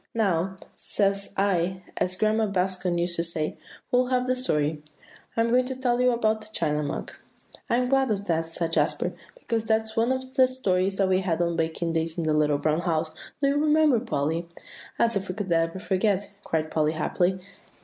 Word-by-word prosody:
"'Now,' 190 -4 +1 0.2
says 200 -1 -1
I, 185 -1 +1
as 185 0 -1
Grandma 215 +2 +2
Bascom 185 -2 0
used 170 0 0
to 170 - +1
say, 160 -2 -2 0.4
'we'll 250 0 +3
have 250 0 +1
the 255 0 +1
story.' 155 - 0 0.6
I'm 230 0 +3
going 250 +1 +4
to 260 - -3
tell 250 -1 +1
you 250 - +5
about 220 -2 +1
'The 215 - -10
China 150 -5 0
Mug.'" 145 - -4 0.6
"I'm 250 +1 +2
glad 270 0 +2
of 200 -2 -1
that," 165 -3 0
said 165 0 -3
Jasper, - - +1 0.2
"because 230 - -2
that 220 0 +3
was 220 0 -11
one 230 +3 +2
of 260 0 -3
the 260 -1 +5
stories 195 -7 0
we 190 -1 +3
had 175 -3 -1
on 170 -1 +1
a - - -3
baking 165 +1 -1
day 165 0 0
in 170 - -1
The 155 -1 +1
Little 150 -1 +3
Brown 155 +2 +1
House, 160 -2 -1 0.3
do 280 - +3
you 280 - +1
remember, 305 -4 +4
Polly?" 165 - -1 0.5
"As 230 -1 +2
if 195 -1 -2
we 185 - -3
could 195 -3 -4
ever 165 +1 +1
forget," 200 0 0
cried 155 -1 -1
Polly 155 0 +1
happily. 175 +4 0
190 Hz, 200 wpm, -26 LUFS, 165-230 Hz, 0.6 s, you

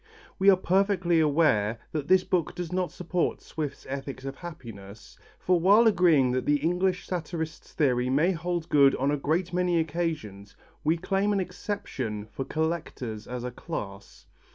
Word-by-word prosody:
We 195 +1 +6
are 190 - +6
perfectly 185 -2 +2
aware 145 -9 +2
that 150 -3 -3
this 185 0 +5
book 175 -5 -1
does 175 -1 -5
not 180 -1 -1
support 180 0 -2
Swift's 150 -3 -6
ethics 135 -1 -6
of 135 0 -5
happiness, 115 - -10 0.2
for 180 -1 +2
while 200 +7 +6
agreeing 170 - +4
that 130 0 -2
the 145 - +4
English 180 +4 0
satirist's 160 -3 -5
theory 125 -4 +1
may 150 +8 +3
hold 175 -1 -3
good 140 -2 +5
on 135 +2 0
a - - +2
great 165 +5 -1
many 180 -1 +2
occasions, 155 - -3 0.3
we 160 +3 +2
claim 195 +4 0
an 200 - +1
exception 180 - -4
for 135 - -4
collectors 155 -9 -3
as 125 -1 -5
a 125 - -4
class. 100 - -7
160 Hz, 160 wpm, -27 LUFS, 135-180 Hz, 0.3 s, We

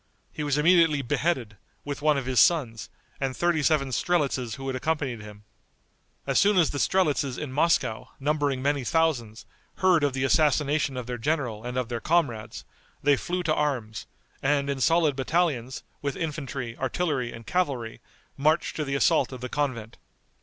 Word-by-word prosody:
He 150 - -4
was 145 -1 0
immediately 160 -2 +4
beheaded, 130 -5 -1 0.3
with 145 -1 -5
one 150 -1 +3
of 135 - -3
his 130 -1 +1
sons, 125 -10 +2 0.3
and 135 -1 -2
thirty 175 -3 +1
seven 150 -3 +2
strelitzes 135 -5 0
who 135 -1 -8
had 135 -1 -2
accompanied 135 -4 -2
him. 105 0 -12 0.8
As - - +2
soon 205 0 +4
as 170 -4 +4
the 145 - -3
strelitzes 145 -9 +1
in 150 -3 -5
Moscow, 145 -7 +1
numbering 145 -2 0
many 140 -1 +1
thousands, 120 -7 0 0.3
heard 180 -5 +3
of 145 -2 +1
the 130 0 -2
assassination 145 -1 +2
of 125 - -4
their 125 0 -5
general 120 -5 -1
and 125 +1 -4
of 125 -2 -1
their 120 -2 -3
comrades, 120 -10 -1 0.4
they 145 0 +5
flew 180 +7 -3
to 155 -2 +1
arms, 130 -8 -2 0.3
and 140 0 +1
in 135 -1 -4
solid 160 +2 +3
battalions, 135 -3 -1 0.2
with 140 -2 -2
infantry, 140 -6 -4
artillery 135 -3 -1
and 115 0 -10
cavalry, 135 -11 -2 0.4
marched 155 +4 +1
to 155 - -1
the 140 -1 -2
assault 140 - +2
of 130 -2 -8
the 125 - -5
convent. 120 -6 -3
140 Hz, 170 wpm, -26 LUFS, 125-155 Hz, 0.8 s, they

